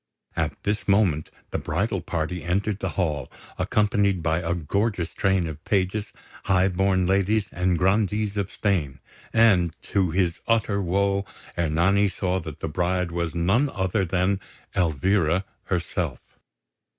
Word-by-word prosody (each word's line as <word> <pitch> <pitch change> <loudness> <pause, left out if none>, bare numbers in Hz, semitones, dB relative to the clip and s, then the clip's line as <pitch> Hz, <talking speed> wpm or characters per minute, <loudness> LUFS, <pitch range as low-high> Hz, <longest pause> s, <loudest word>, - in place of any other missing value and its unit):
At - - -2
this 105 +1 -1
moment 95 -7 +2 0.2
the - - -1
bridal 100 -2 -1
party 85 +1 -3
entered 95 +5 -1
the - - -2
hall, 75 -8 -1 0.3
accompanied 100 -4 +2
by 80 +1 +1
a 85 0 -1
gorgeous 90 +2 -1
train 95 -3 +1
of 80 -1 -7
pages, 100 +1 0 0.3
high 95 0 +3
born 95 0 +2
ladies, 100 +3 +2
and 90 0 +1
Grandees 105 +3 +1
of 100 -2 -2
Spain; 80 -10 -1 0.3
and, 95 -8 +4
to 95 -3 +1
his 85 0 0
utter 110 -3 +2
woe, 100 +2 +1 0.3
Ernani 85 +5 +3
saw 95 -1 -1
that 80 -5 -8
the - - -2
bride 90 +2 0
was 85 -1 -2
none 95 +12 +2
other 95 -2 0
than 95 +2 +1 0.4
Elvira 90 +2 +2 0.2
herself. 85 -5 -2
95 Hz, 140 wpm, -25 LUFS, 85-100 Hz, 0.4 s, and